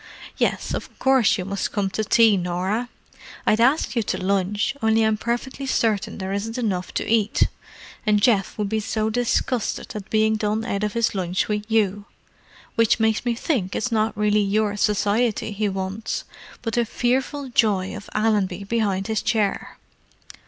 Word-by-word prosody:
Yes, - - 0
of - - -6
course 265 -4 +3
you 185 - -4
must 200 0 -2
come 195 -2 -1
to 220 - -1
tea, 225 0 +5
Norah. 185 +6 -1 0.6
I'd 215 - +3
ask 265 +3 +2
you 235 - +2
to 190 - -2
lunch, 200 +5 0
only 220 0 +3
I'm 220 0 +3
perfectly 240 +5 -3
certain 215 -4 0
there 190 0 -4
isn't 225 +4 -3
enough 195 -7 -2
to - - -1
eat! 220 -2 +2 0.6
And 210 -2 +3
Geoff 205 -2 +2
would 210 -1 -1
be 220 +2 0
so 215 +1 -1
disgusted 245 0 -1
at 210 -1 -7
being 220 0 +2
done 215 +1 -1
out 200 -3 -2
of 210 - -1
his 230 -1 +1
lunch 185 -2 -1
with 210 0 -3
you, 205 -2 +1 0.7
which 230 0 +3
makes 220 -1 +2
me 240 -1 +1
think 230 - -1
it's 250 - -1
not 220 -1 0
really 210 0 +3
your 205 +1 +1
society 210 +2 +1
he 210 0 -1
wants, 190 +3 -3 0.4
but 225 -2 -3
the 240 - +2
fearful 260 +4 -1
joy 205 -6 +1
of 205 - -9
Allenby 205 -3 +1
behind 200 -3 0
his 220 0 -1
chair." 210 -3 -1
215 Hz, 170 wpm, -23 LUFS, 200-225 Hz, 0.7 s, tea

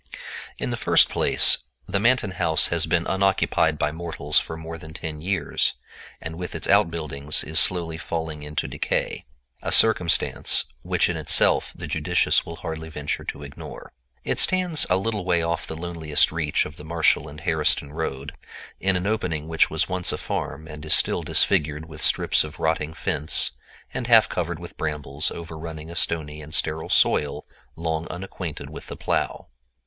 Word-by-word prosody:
In - - -3
the - - -2
first - - +5
place - - +5 0.3
the 100 +1 0
Manton 115 -2 +2
house 85 -3 +3
has 85 -1 0
been 85 -1 +1
unoccupied 95 -5 +1
by 75 +1 0
mortals 85 +1 -1
for 80 - -7
more 80 +1 -8
than 80 0 -11
ten 75 -2 -6
years, 95 +3 0 0.4
and 80 +1 -7
with 90 -2 -6
its - - -1
outbuildings 75 -3 +1
is 80 +1 +4
slowly 85 -3 +3
falling 80 -3 -4
into 75 0 -3
decay—a 60 +1 -5
circumstance 95 -7 +4 0.2
which - - +1
in - - -2
itself - - +3
the - - -7
judicious - - +2
will 85 - -8
hardly 80 0 -6
venture 75 -2 -4
to 75 - -6
ignore. 70 0 -10 0.3
It - - -1
stands 180 -4 +2
a 90 - +3
little 105 0 -2
way 85 -2 +1
off 85 0 -2
the 80 - -6
loneliest 80 -3 0
reach 80 -2 0
of 75 - -10
the 75 - -10
Marshall 80 -1 +1
and 75 +1 -11
Harriston 75 -3 +1
road, 75 -3 -4 0.5
in 95 0 +2
an 90 +1 -1
opening 90 -8 -2
which 80 -1 +2
was - - -1
once 90 -1 0
a - - -3
farm 80 - -5
and 75 -1 -10
is 75 - +6
still - - +1
disfigured 75 +1 +2
with 80 -1 -10
strips - - +3
of 75 0 -10
rotting 80 0 -1
fence 80 -2 +1 0.4
and 125 -2 -4
half 115 -2 +6
covered 85 -1 -3
with 85 +1 -11
brambles 75 -1 -2
overrunning 80 -1 -8
a - - -9
stony 75 -3 -1
and 75 +1 -3
sterile 80 0 0
soil 75 -1 +2 0.3
long 80 0 -3
unacquainted 90 -3 -7
with - - -10
the - - -8
plow. - - -2
80 Hz, 170 wpm, -24 LUFS, 75-85 Hz, 0.5 s, is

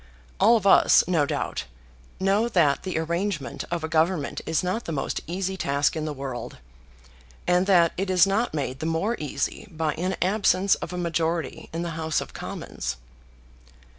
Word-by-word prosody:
All 230 +2 +6
of 205 - -5
us, 195 - +6
no 160 -5 +2
doubt, - - -3 0.5
know 200 +5 +2
that 160 -9 +3
the 185 -3 -3
arrangement 170 - -2
of 170 -2 -2
a - - -1
government 160 -1 0
is 160 +1 +1
not 185 +6 -2
the - - -4
most 145 - -2
easy 190 +3 -2
task 140 -4 +1
in 155 -1 -2
the 155 - -2
world; 135 -3 -6 0.9
and 180 +1 +2
that 175 -4 +5
it 195 +1 -2
is 180 -1 +5
not 205 +5 0
made 135 -3 -3
the 160 - -2
more 165 +8 0
easy 145 +6 -3
by 160 -3 -1
an 180 +4 -2
absence 195 0 +3
of - - -3
a 180 - -4
majority 170 -1 -2
in 165 +1 -3
the 170 - -3
House 160 -1 -1
of - - -7
Commons." 65 +2 -5
170 Hz, 175 wpm, -25 LUFS, 155-190 Hz, 0.9 s, All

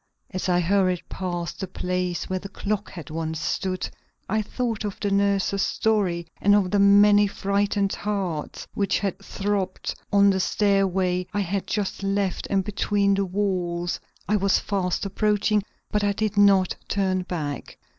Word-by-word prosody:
As 185 -1 -2
I 175 0 +3
hurried 185 0 +2
past 175 -2 -4
the 190 - -3
place 180 -1 -2
where 185 0 -2
the 195 - -8
clock 205 +1 -3
had 160 -5 -9
once 160 0 -3
stood, 185 +3 -2 0.4
I 220 +2 +1
thought 225 0 -3
of 205 -2 -4
the 205 - -1
nurses' 200 0 +2
story 195 -8 +1 0.2
and 205 +1 +5
of 190 -3 +2
the 205 - +3
many 205 +1 +6
frightened 200 0 0
hearts 190 -7 -3
which 200 -1 +1
had 195 -2 -2
throbbed 195 -1 -2 0.2
on 200 0 +6
the 190 - 0
stairway 190 -2 +1
I 205 - +2
had 195 +1 -2
just 205 -2 -2
left 195 -1 -1
and 195 -1 +2
between 200 0 +1
the 195 0 +1
walls 180 -3 -1 0.3
I 210 - +3
was 195 -1 +3
fast 190 -2 -1
approaching; 210 +1 +1 0.3
but 210 -1 +1
I 205 0 +2
did 215 0 -1
not 200 -2 +5
turn 190 -2 0
back. 155 -6 -5
195 Hz, 160 wpm, -25 LUFS, 185-205 Hz, 0.4 s, many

